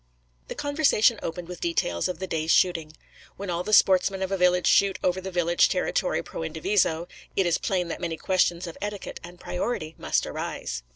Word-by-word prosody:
The - - -6
conversation 285 -6 +2
opened 170 +1 -5
with 180 -1 -8
details 90 - 0
of 180 - -4
the 190 - -4
day's 160 -3 -3
shooting. 165 -4 +2 0.4
When 195 -2 -4
all 170 0 -1
the 215 - -4
sportsmen 190 -1 +4
of 190 - -3
a - - +2
village 180 0 +3
shoot 195 -1 +4
over 185 +1 +1
the 190 - -5
village 175 -1 +3
territory - - 0
pro - - -7
indiviso, 170 - 0 0.3
it 195 - +2
is 175 - +1
plain 180 -3 -1
that 165 - -5
many 165 -2 -3
questions 180 -1 +1
of 170 - -9
etiquette 205 -1 -5
and 175 +1 -11
priority 180 -5 -3
must - - 0
arise. 60 - -4
180 Hz, 190 wpm, -26 LUFS, 170-190 Hz, 0.4 s, sportsmen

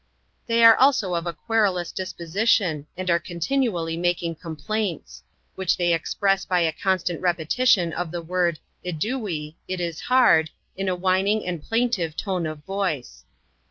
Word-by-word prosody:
They 230 0 +3
are 225 -1 +10
also 260 -9 +3
of 170 0 -2
a 170 - -2
querulous 190 -1 0
disposition, 185 -3 0
and 185 0 -4
are 170 - +3
continu 180 - -1
ally 165 -4 -3
making 175 -1 0
complaints; 170 +4 -4 0.3
which 190 -2 0
they 175 -1 +2
express 195 +4 0
by 180 -1 +1
a 165 -1 +2
constant 180 0 -1
repetition 175 +2 +2
of 175 0 -3
the 170 0 -5
word 175 -1 0 0.3
eduiy, 180 - -3
"it 185 -1 -3
is 170 -2 -3
hard," 240 -12 +4 0.3
in 195 0 -2
a 185 - 0
whining 190 +4 +1
and 175 -3 -3
plaintive 225 -7 0
tone 185 -5 -2
of 155 -1 -7
voice. 155 - -3
180 Hz, 155 wpm, -24 LUFS, 165-200 Hz, 0.3 s, are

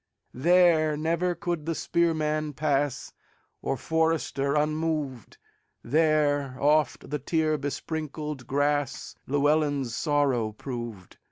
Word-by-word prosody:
There 160 +1 +4
never 170 +3 0
could 170 -2 -3
the 165 - 0
spearman 155 -3 0
pass, 140 -2 -1 0.5
Or 135 - -1
forester, 160 -2 0
unmoved; 150 - -1 0.5
There 145 -2 +2
oft 150 -2 +1
the 150 - -1
tear 155 +2 +1
besprinkled 150 -1 -4
grassLlewelyn's 145 -1 0
sorrow 135 -8 +1
proved. 120 -6 -7
150 Hz, 90 wpm, -27 LUFS, 140-155 Hz, 0.5 s, There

